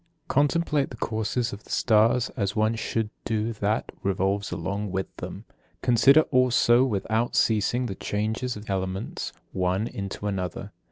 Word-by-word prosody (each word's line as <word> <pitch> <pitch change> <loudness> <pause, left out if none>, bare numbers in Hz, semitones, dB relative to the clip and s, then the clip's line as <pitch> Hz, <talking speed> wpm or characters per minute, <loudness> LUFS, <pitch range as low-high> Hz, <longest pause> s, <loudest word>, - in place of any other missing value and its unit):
47. - - -2
Contemplate 145 +1 +2
the 120 - -9
courses 115 +2 -1
of 100 - -8
the - - -21
stars, 115 +1 +3
as 100 -5 -1
one 110 +1 +2
should 110 -1 -2
do 110 0 -1
that 105 0 -1
revolves 100 +1 0
along 100 +1 -3
with 95 +1 -4
them. - - -7 0.4
Consider 135 +5 +6
also 125 -1 +4
without 110 0 0
ceasing 115 +3 +2
the 115 - -3
changes 110 +6 -2
of 105 - -10
elements, 95 +1 -3 0.2
one 95 +3 0
into 100 -2 -5
another. 95 -3 -3
110 Hz, 150 wpm, -26 LUFS, 100-120 Hz, 0.4 s, Consider